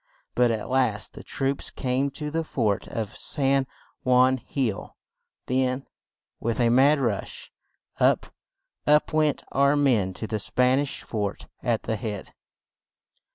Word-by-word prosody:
But 125 -1 +3
at 110 -2 -2
last 125 -5 0
the - - -10
troops 135 0 -2
came 130 +2 -1
to 150 +1 -5
the 165 +1 0
fort 110 -10 -1
of 110 -3 -4
San 135 -2 +1 0.4
Juan 130 +1 +4
Hill; 120 -3 -3 0.5
then, 130 +1 0 0.5
with 115 +1 -2
a 120 -1 +4
mad 140 +5 +5
rush, 115 -7 -3 0.5
up, - - +3 0.6
up 150 +1 +4
went 155 -2 +2
our 140 +1 +3
men 115 -10 +2
to 110 - -5
the 110 -1 -2
Span 125 +5 +2
ish 145 -1 -3
fort 105 -3 -3 0.2
at 115 -3 0
the 110 -1 -2
head! 105 -2 -5
130 Hz, 140 wpm, -26 LUFS, 110-140 Hz, 0.6 s, mad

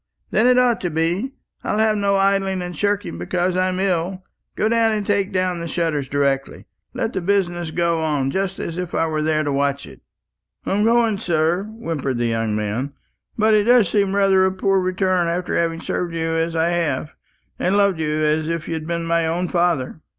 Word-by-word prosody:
"Then 225 +3 +3
it 250 0 +5
ought 250 -2 +3
to 180 - -1
be. 170 - -1 0.3
I'll - - -1
have 220 0 +3
no 200 -1 +1
idling 195 -1 +1
and 180 -1 -6
shirking 205 - -1
because 180 - -1
I'm 185 0 0
ill. 185 0 -1 0.3
Go 215 - +1
down 230 0 +3
and 210 -1 -2
take 200 0 0
down 185 -2 0
the 170 - -4
shutters 160 -5 -1
directly. 140 -1 -1 0.3
Let 225 - -2
the 190 - -2
business 175 -3 0
go 170 0 0
on 145 -4 0
just 190 +2 -2
as 170 +1 -4
if 180 -1 -4
I - - +2
was 155 -1 -1
there 155 -1 +1
to 145 - -1
watch 140 -4 0
it." 70 -3 -14 0.6
"I'm 205 +2 +1
going, 230 -2 +3
sir," 170 +2 0
whimpered 165 - -4
the 120 - 0
young 115 -2 -1
man; 105 +7 -2 0.4
"but 220 0 +3
it 210 -1 +3
does 240 -5 +5
seem 200 -2 +1
rather 195 -1 +4
a 190 - +3
poor 195 +1 +1
return 185 -1 +1
after 175 +1 -2
having 165 -1 0
served 170 -2 -3
you 165 0 -1
as 165 +1 -1
I 165 +1 +2
have, 155 -4 -1 0.5
and 190 +3 +1
loved 200 -4 +3
you 155 0 -1
as 155 +1 +1
if 165 -1 -3
you'd 160 -1 -4
been 170 0 -2
my 165 0 +1
own 175 +2 -1
father." 170 -5 0
175 Hz, 200 wpm, -21 LUFS, 160-195 Hz, 0.6 s, it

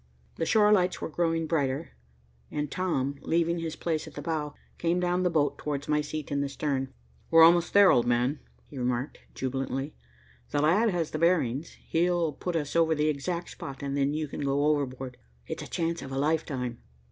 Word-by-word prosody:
The 165 - -1
shore 210 -1 +5
lights 185 -3 +3
were - - -4
growing 165 0 0
brighter, 150 -1 -1 0.6
and 150 -1 -3
Tom, 140 -7 -1
leaving 170 +1 +1
his 165 -1 -4
place 160 -2 -2
at - - -12
the - - -5
bow, 150 -3 -2 0.2
came 170 +1 +1
down 180 0 +1
the 180 - +2
boat 145 -4 +1
towards 145 -1 -3
my 150 0 +2
seat 150 0 -5
in 140 0 +1
the 140 - -1
stern. 135 -1 -2 0.4
"We're 165 0 +8
almost 170 +1 +6
there, 200 -1 +8
old 120 -1 +3
man," 125 +4 +1 0.3
he 140 - -9
remarked 125 +2 -2 0.2
jubilantly. 135 +2 -3 0.6
"The 145 - 0
lad 200 +9 +4
has 175 -5 -1
the 155 - -3
bearings. 165 -4 +1
He'll 170 -2 +1
put 175 +5 -4
us 150 -2 -2
over 165 -1 +4
the 150 +1 +2
exact 170 +4 -3
spot, 135 0 -8
and 140 0 -2
then 140 +1 +1
you 155 0 -2
can 145 - -6
go 140 +1 +1
overboard. 135 -4 -1 0.3
It's - - -5
a - - -7
chance 170 0 -1
of 135 - -8
a 135 - -3
lifetime." 135 -5 -1
150 Hz, 195 wpm, -28 LUFS, 140-170 Hz, 0.6 s, We're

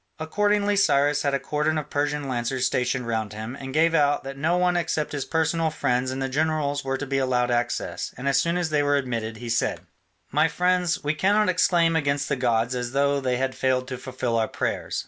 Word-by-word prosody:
Accordingly 205 +5 +1
Cyrus 145 -6 +3
had 140 -1 +1
a - - 0
cordon 150 +3 -1
of 150 -1 -5
Persian 145 0 -1
lancers 125 0 -1
stationed 125 -1 0
round 110 -2 -2
him, 110 +4 -6
and 135 -1 -7
gave 165 +3 +3
out 145 -2 +2
that 135 0 -6
no 160 +6 +1
one 180 0 +2
except 160 -3 -1
his 145 -2 -3
personal 160 0 0
friends 125 -3 0
and 130 +1 -4
the 135 - -1
generals 145 0 0
were 135 0 -1
to 145 - -4
be 135 -1 -1
allowed 125 -2 +1
access, 120 0 -2
and 125 +3 -4
as 140 - +3
soon 170 +1 0
as 175 -3 -1
they 150 -1 +2
were 145 0 +2
admitted 115 -5 -2
he 120 +2 -8
said: 115 +1 0 0.5
"My - - +3
friends, 180 -1 0
we 145 +1 +1
cannot 205 +5 +2
exclaim 170 -2 +3
against 140 -2 0
the 140 - +1
gods 120 -1 +1
as 125 0 -3
though 140 0 +2
they 125 -1 0
had 130 +1 -1
failed 130 -1 0
to 130 - -4
fulfil 125 -3 -2
our 110 - +1
prayers. - - -3
140 Hz, 220 wpm, -24 LUFS, 125-160 Hz, 0.5 s, Cyrus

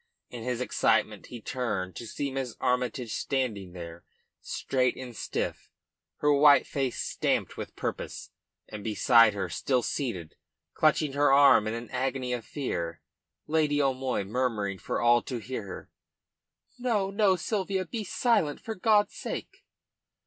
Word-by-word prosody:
In 120 - -7
his 125 +1 -2
excitement - - +1
he 120 - -8
turned, 105 -7 -3
to 115 - -7
see 140 +4 -3
Miss 130 -3 -4
Armytage 125 -2 -1
standing 110 -10 -2
there, 85 -1 -9 0.4
straight 125 -2 0
and 125 -2 -8
stiff, - - -3 0.5
her 150 0 +4
white 145 0 +6
face 135 -3 -2
stamped - - -1
with - - -7
purpose; - - -5 0.4
and 105 -1 -8
beside 115 0 +5
her, 95 -2 -2
still 125 +8 0
seated, 100 - -3 0.4
clutching 155 -2 +2
her 145 0 +3
arm 135 -6 +6
in 110 - -2
an 115 0 -7
agony 130 0 -1
of 120 -2 -3
fear, 85 - -3 0.5
Lady 150 -2 +2
O'Moy, 130 -5 0
murmuring 105 -3 -1
for - - -2
all 120 0 +5
to 125 - -5
hear 115 -2 -5
her: 90 - -9 0.9
"No, 215 -6 0
no, 200 -2 +3
Sylvia. 190 +1 -1
Be 225 +3 -4
silent, 205 - +1
for 225 - -5
God's 210 0 +3
sake!" 385 +1 -6
130 Hz, 145 wpm, -28 LUFS, 110-145 Hz, 0.9 s, white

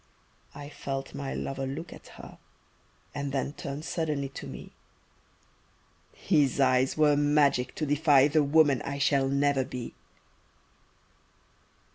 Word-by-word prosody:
I 145 0 -8
felt 135 -2 -6
my 140 -1 -5
lover 135 0 -4
look 160 +5 -6
at - - -14
her - - -12 0.7
And 140 -1 -4
then 135 +1 -2
turn 140 0 -6
suddenly 150 -5 -2
to 135 - -9
me, - - -10 1.4
His 140 -3 +1
eyes 130 0 +2
were 150 -1 +4
magic 145 -3 +2
to 155 - -2
defy 145 -1 +4
The 155 +1 +2
woman 145 -2 +3
I 140 0 -4
shall 140 -1 +2
never 140 -1 +1
be. 125 -2 -7
140 Hz, 125 wpm, -28 LUFS, 135-150 Hz, 1.4 s, were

